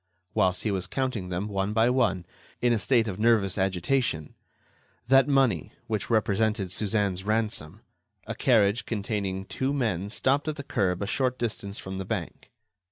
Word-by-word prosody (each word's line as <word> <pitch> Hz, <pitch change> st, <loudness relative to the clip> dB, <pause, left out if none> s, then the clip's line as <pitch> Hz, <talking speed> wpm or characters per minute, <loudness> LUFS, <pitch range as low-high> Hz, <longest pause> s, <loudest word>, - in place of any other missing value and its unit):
Whilst 95 Hz, -4 st, +1 dB
he 110 Hz, -, 0 dB
was 95 Hz, -2 st, -1 dB
counting 125 Hz, -6 st, -2 dB
them, 90 Hz, +3 st, -2 dB
one 100 Hz, 0 st, -1 dB
by 110 Hz, +1 st, +4 dB
one, 95 Hz, -9 st, +1 dB, 0.3 s
in 120 Hz, -1 st, +3 dB
a 115 Hz, -, +1 dB
state 115 Hz, 0 st, +2 dB
of 95 Hz, -1 st, -4 dB
nervous 110 Hz, -4 st, +3 dB
agitation—that 105 Hz, -, -1 dB
money, 130 Hz, -, +2 dB
which 110 Hz, -2 st, -3 dB
represented 110 Hz, -3 st, +1 dB
Suzanne's 100 Hz, -2 st, 0 dB
ransom—a 110 Hz, -2 st, -4 dB
carriage 110 Hz, -2 st, +2 dB
containing 100 Hz, -3 st, -2 dB
two 130 Hz, +6 st, -2 dB
men 100 Hz, -8 st, -1 dB
stopped 135 Hz, +7 st, +1 dB
at 155 Hz, -, -1 dB
the 140 Hz, -, -6 dB
curb 95 Hz, -7 st, 0 dB
a -, -, -1 dB
short 125 Hz, +4 st, 0 dB
distance 105 Hz, -4 st, -3 dB
from 95 Hz, 0 st, -6 dB
the 95 Hz, -, -4 dB
bank. 95 Hz, -5 st, -5 dB
105 Hz, 155 wpm, -27 LUFS, 95-120 Hz, 0.3 s, by